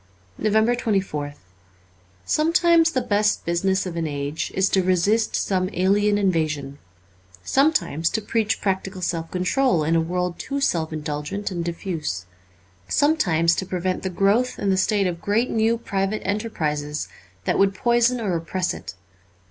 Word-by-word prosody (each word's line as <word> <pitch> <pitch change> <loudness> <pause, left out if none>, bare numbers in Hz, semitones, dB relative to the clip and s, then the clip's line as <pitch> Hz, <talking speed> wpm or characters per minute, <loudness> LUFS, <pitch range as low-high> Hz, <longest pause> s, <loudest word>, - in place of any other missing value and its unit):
* 90 0 -33
363 220 +1 +1
NOVEMBER - - +5 0.3
24th 145 - -16 0.9
SOMETIMES 335 +1 +4
ji - - -8
the 255 - 0
best 210 +1 +1
business 190 +3 +1
of 180 -2 -5
an 165 -1 -1
age 145 +1 -3
is 190 +1 +3
to 190 - +2
resist 185 +5 +1
some 185 -1 0
alien 205 +3 +2
invasion; 155 -7 -1 0.6
some 275 - +3
times 165 - 0
to 220 - -1
preach 220 0 -1
practical 190 -1 -2
self 165 -2 -2
control 185 - +1
in 160 +2 +1
a 165 - +3
world 180 +1 -2
too 280 +1 -3
self 165 - 0
indulgent 155 +6 -4
and 175 -2 -3
diffuse; 170 - -4 0.6
sometimes 170 - +2
to 190 - -1
prevent 185 0 -2
the 190 - -2
growth 200 +7 +1
in 200 - 0
the - - +3
state 200 +1 +2
of 170 -2 -2
great 220 +7 +1
new 225 +1 +2
private 200 -2 -2
enterprises 150 -9 -2 0.4
that - - +1
would 195 0 +3
poison 240 +3 +2
or 200 -6 -1
oppress 175 +2 -2
it. 90 - -8
190 Hz, 160 wpm, -23 LUFS, 165-215 Hz, 0.9 s, NOVEMBER